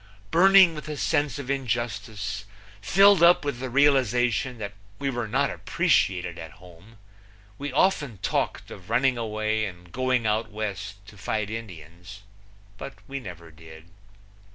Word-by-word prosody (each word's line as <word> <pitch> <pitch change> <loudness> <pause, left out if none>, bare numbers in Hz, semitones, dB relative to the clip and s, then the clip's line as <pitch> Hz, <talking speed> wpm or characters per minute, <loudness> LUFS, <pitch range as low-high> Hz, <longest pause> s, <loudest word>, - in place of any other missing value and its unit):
Burning 190 0 +6
with 150 -1 -8
a 150 - -5
sense 145 -1 0
of 140 -2 -4
injustice, 110 -5 -3 0.4
filled 195 - +5
up 170 -3 +6
with 140 -4 -3
the 130 0 -4
realization 125 -2 +2
that 100 -2 -6 0.2
we 140 +3 -2
were 120 -3 -3
not 105 - 0
appreciated 90 -1 0
at 80 -1 -9
home, 90 +5 -17 0.6
we 145 0 -4
often 145 - +1
talked - - -2
of 90 +1 -12
running 125 +3 +2
away 110 -1 -2
and 90 -4 -8
going 130 0 0
out 110 +1 0
West 100 -1 -6
to 105 -1 -15
fight 105 0 -2
Indians, 95 -2 -9 0.6
but 135 - -8
we 140 0 -5
never 85 -8 -10
did. 80 +1 -15
110 Hz, 145 wpm, -25 LUFS, 100-135 Hz, 0.6 s, Burning